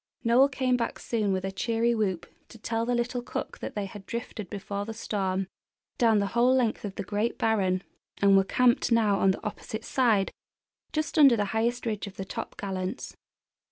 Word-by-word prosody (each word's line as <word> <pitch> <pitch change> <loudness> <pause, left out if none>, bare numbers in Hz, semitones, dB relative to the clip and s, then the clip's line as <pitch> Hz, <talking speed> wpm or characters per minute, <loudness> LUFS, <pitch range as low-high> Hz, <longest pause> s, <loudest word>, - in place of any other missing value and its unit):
Noel 250 +4 +5
came 260 -2 +1
back 230 - -2
soon 215 -4 -1
with 190 0 -1
a 195 - -2
cheery 230 +4 +1
whoop 195 -6 -1 0.2
to 225 - -12
tell 225 +1 -2
the 245 - +1
little 245 +1 -1
cook 245 - -5
that - - -6
they 205 -1 -2
had 195 0 -10
drifted 230 -4 -5
before 200 0 -4
the 220 +2 -6
storm 195 -4 -2 0.5
down 225 -3 +5
the 200 - +2
whole 245 +2 +4
length 240 -4 +1
of 200 -2 -5
the 200 - -3
great 210 +4 -1
barren, 195 -4 +1 0.4
and 200 -1 +5
were 195 - +6
camped 245 +4 +2
now 215 -4 +3
on 195 - +4
the 190 - -1
opposite 220 +1 -5
side, 225 -7 +2 0.6
just 310 0 -1
under 275 -5 +8
the 205 - +1
highest 235 +3 0
ridge 215 -2 -2
of 195 - -10
the 195 - -5
Top - - -6
Gallants. 190 -2 -4
220 Hz, 195 wpm, -28 LUFS, 195-235 Hz, 0.6 s, under